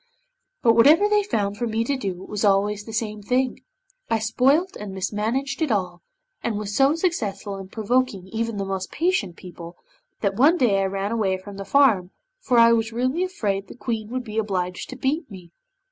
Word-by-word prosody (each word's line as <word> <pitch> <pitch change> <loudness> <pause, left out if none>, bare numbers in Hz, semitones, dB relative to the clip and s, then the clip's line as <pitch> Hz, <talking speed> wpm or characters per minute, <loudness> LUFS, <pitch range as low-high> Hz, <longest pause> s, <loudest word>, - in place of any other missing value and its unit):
'But 230 -2 +6
whatever 300 - +6
they 420 0 +3
found 205 - -2
for 240 +1 -1
me 225 0 0
to 275 +4 -1
do 190 -7 -4
it - - -11
was 210 0 -3
always 205 +1 +2
the 225 - -8
same 215 -1 -3
thing, 250 +4 0 0.5
I 225 - +2
spoilt 270 - +2
and 200 -2 -7
mismanaged 230 - -2
it 310 -5 +1
all, 180 -4 -1 0.4
and 225 -3 -2
was 205 -1 -4
so 275 +3 +4
successful 215 - -2
in 190 - -8
provoking 220 -2 -1
even 230 0 -2
the 195 - -2
most 190 -1 -4
patient 325 - 0
people, 175 -1 -11 0.4
that 200 -2 0
one 305 +7 +5
day 210 - +3
I - - +1
ran 195 +2 -2
away 200 -5 0
from 195 +1 -11
the 195 - -6
farm, 220 -11 +4 0.3
for 255 - +1
I 230 0 +7
was 225 0 0
really 255 +9 0
afraid 205 - -2
the - - -11
Queen 225 -3 -4
would 255 +1 -3
be 220 -1 -3
obliged 185 -4 -3
to 260 - -7
beat 275 +5 -1
me. 180 -4 -12
220 Hz, 200 wpm, -23 LUFS, 195-255 Hz, 0.5 s, I